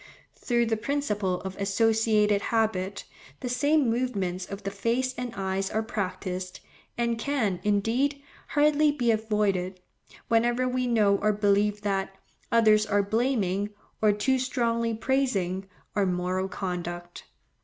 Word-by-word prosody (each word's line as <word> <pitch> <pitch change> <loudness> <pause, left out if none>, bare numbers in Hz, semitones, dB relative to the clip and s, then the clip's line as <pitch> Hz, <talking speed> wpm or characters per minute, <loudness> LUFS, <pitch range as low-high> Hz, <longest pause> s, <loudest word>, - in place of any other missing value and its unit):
Through 240 -1 0
the 225 -1 0
principle 210 -8 -1
of 190 -1 -6
associated 210 0 +2
habit, 205 -5 -1 0.4
the 250 - -3
same 285 +3 +2
movements 200 -7 -1
of 200 +1 -7
the 195 - -3
face 235 +6 0
and 250 -1 -4
eyes 195 0 -1
are 220 +1 -1
practised, 185 -3 -4 0.4
and 235 -1 0
can, 225 -9 0
indeed, 230 +8 +1 0.3
hardly 300 0 +3
be 245 -5 +1
avoided, 210 -4 0 0.5
whenever 240 +2 +2
we 255 0 0
know 210 -4 +3
or 215 +1 +2
believe 205 0 +2
that, 195 -1 -1 0.4
others 215 -2 +5
are 205 -1 +2
blaming, 205 -3 0 0.3
or 215 -1 +5
too 255 +6 +1
strongly 235 -3 0
praising, 215 -7 0 0.3
our 200 -2 +2
moral 185 +1 -1
conduct. 175 -2 -5
215 Hz, 130 wpm, -27 LUFS, 195-240 Hz, 0.5 s, others